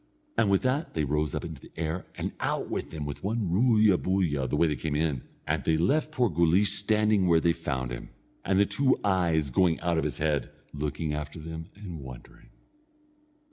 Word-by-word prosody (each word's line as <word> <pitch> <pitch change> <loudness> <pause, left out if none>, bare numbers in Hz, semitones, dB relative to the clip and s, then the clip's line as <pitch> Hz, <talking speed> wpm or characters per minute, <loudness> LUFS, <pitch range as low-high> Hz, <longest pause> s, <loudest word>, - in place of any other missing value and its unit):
And 105 - +3
with 100 -1 +3
that 135 +5 -1
they 80 - +1
rose 75 0 0
up - - -3
into - - -8
the - - -15
air, 80 +2 -3
and - - -3
out - - -1
with - - -3
them 75 -2 -5
with 70 -1 -6
one 105 -3 -1
roolya 110 -2 +4
boolya 85 -8 0
the - - 0
way 85 - +4
they 75 - 0
came; 75 -1 -3
and 75 -4 -2
they 80 - +2
left 150 - +1
poor 125 -5 +2
Guleesh 85 +3 +3
standing 105 -1 +2
where 85 -1 +5
they 85 +1 +2
found 65 -7 -3
him, - - -6 0.3
and 95 - +1
the 100 - +5
two 130 +7 +2
eyes 85 -7 +1
going 85 +4 +3
out 85 -1 +1
of - - -1
his 75 -4 -3
head, 75 -2 0 0.2
looking 75 +1 -2
after 75 +1 -5
them 80 +1 -7
and 95 -6 -8
wondering. 65 -2 -12
85 Hz, 200 wpm, -28 LUFS, 75-100 Hz, 0.3 s, where